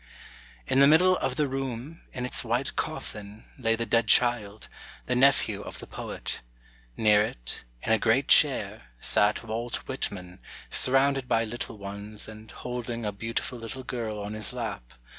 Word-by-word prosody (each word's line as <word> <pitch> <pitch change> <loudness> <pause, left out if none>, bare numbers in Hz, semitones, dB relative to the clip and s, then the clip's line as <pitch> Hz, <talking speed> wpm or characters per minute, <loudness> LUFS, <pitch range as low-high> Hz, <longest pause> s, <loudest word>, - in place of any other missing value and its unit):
["In 130 - +2
the 140 - +8
middle 180 +5 +6
of 130 - -1
the 150 +1 +1
room, 135 +3 -5
in 125 -1 -4
its 125 - +1
white 120 +3 -1
coffin, 105 +1 -5
lay 115 -2 +2
the 115 +1 -2
dead 115 -1 +2
child, 110 -3 +3 0.4
the 125 - 0
nephew 125 -6 +3
of - - -8
the - - -8
poet. - - -5 0.6
Near 105 -1 +5
it, - - -3 0.2
in - - -1
a 110 - +3
great 120 +5 +2
chair, - - +4
sat 105 - +2
Walt 115 +2 -3
Whitman, 90 -8 -4 0.3
surrounded 135 0 +3
by 115 -1 +2
little 115 0 -5
ones, 100 +1 -5
and 110 0 -11
holding 120 -2 -5
a 105 - -1
beautiful 115 +4 -3
little 115 +3 -6
girl 115 -4 -4
on 105 +1 -5
his 110 +2 0
lap. 105 - -5
115 Hz, 160 wpm, -27 LUFS, 105-125 Hz, 0.6 s, the